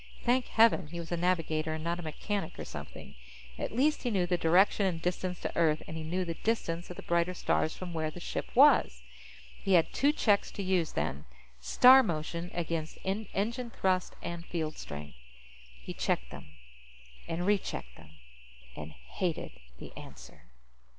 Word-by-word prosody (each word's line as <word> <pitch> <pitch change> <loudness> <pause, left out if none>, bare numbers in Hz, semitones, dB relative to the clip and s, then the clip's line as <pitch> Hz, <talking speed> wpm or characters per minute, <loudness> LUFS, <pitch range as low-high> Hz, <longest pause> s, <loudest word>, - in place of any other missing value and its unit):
Thank 250 +1 +2
heaven 220 -7 +4
he 170 +3 -7
was 170 0 -7
a - - +1
navigator 165 -3 0
and 160 - -6
not 170 +1 -1
a - - -4
mechanic 175 +3 -4
or - - -6
something! - - -9 0.5
At - - -3
least 285 +7 +2
he 245 - -1
knew 190 -5 +1
the 180 0 +1
direction 185 +4 +4
and 170 -3 -2
distance 180 +1 -2
to - - -4
Earth, 155 -2 +2
and 160 - -6
he 160 - -4
knew 180 +4 -2
the 170 - -3
distance 175 -4 -2
of 180 - -7
the - - -9
brighter 170 +1 +1
stars 160 - 0
from 180 -2 -6
where 160 -1 -1
the 165 - -9
ship - - -4
was. - - +5 0.6
He 195 - +2
had 170 -3 +4
two 285 +2 +3
checks 210 -9 +2
to 200 - -4
use, 185 -4 +1
then. 70 +3 -2 0.3
Star 255 - +7
motion 170 -3 -3
against 165 -2 -3
engine 220 +4 -2
thrust 185 -4 0
and 170 -1 -5
field 160 -3 -3
strength. 75 -3 -8 0.6
He - - -7
checked - - -1
them. - - -9 0.8
And 170 +2 -2
rechecked 190 - -1
them. - - -15 0.7
And 75 +1 -8
hated 65 - -4 0.3
the - - -11
answer. - - -12
175 Hz, 175 wpm, -30 LUFS, 160-195 Hz, 0.8 s, Star